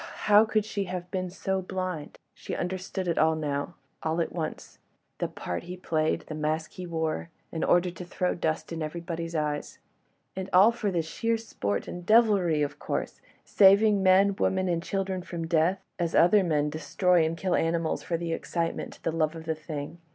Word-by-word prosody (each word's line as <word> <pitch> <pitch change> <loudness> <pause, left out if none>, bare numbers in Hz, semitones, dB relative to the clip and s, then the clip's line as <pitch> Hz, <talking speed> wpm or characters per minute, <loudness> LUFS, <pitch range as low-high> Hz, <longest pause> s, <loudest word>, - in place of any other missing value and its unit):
how 210 +1 +7
could 215 -2 0
she 205 -2 -2
have 180 -1 -5
been 185 -1 -2
so 190 +1 -2
blind? 185 -4 -4 0.2
She - - -6
understood 185 +1 -3
it 170 - 0
now—all 160 +1 -1
at 165 - 0
once... 160 -2 -5 0.4
that - - -3
part 90 - -4
he 180 +1 -7
played—the 155 -2 -1
mask 155 +1 -2
he 180 -1 -7
wore... 160 0 -2 0.2
in 160 - -3
order 175 0 +3
to 180 +1 -8
throw 180 +1 -1
dust 160 -1 -2
in 165 - -4
everybody's 165 +1 -4
eyes. 150 -1 -2 0.6
And 190 0 -4
all 195 +5 +7
for 205 -6 -1
sheer 230 +8 -1
sport 100 - -3
and 175 - -6
devilry 195 -7 +4
of 145 0 -4
course!—saving 200 +1 +2
men, 190 +1 +5
women 190 -1 +1
and 170 -2 0
children 190 0 -2
from 170 -2 -5
death, 170 +4 +1 0.2
as 170 -1 -1
other 190 +4 +6
men 150 -4 +1
destroy 165 +3 +2
and 160 +1 -1
kill 185 0 -1
animals 165 0 0
for 170 - -2
the 170 0 -3
excitement, 165 0 -3
the - - 0
love 160 0 0
of 160 0 -8
the 160 - 0
thing. 155 +1 -7
175 Hz, 175 wpm, -28 LUFS, 160-190 Hz, 0.6 s, how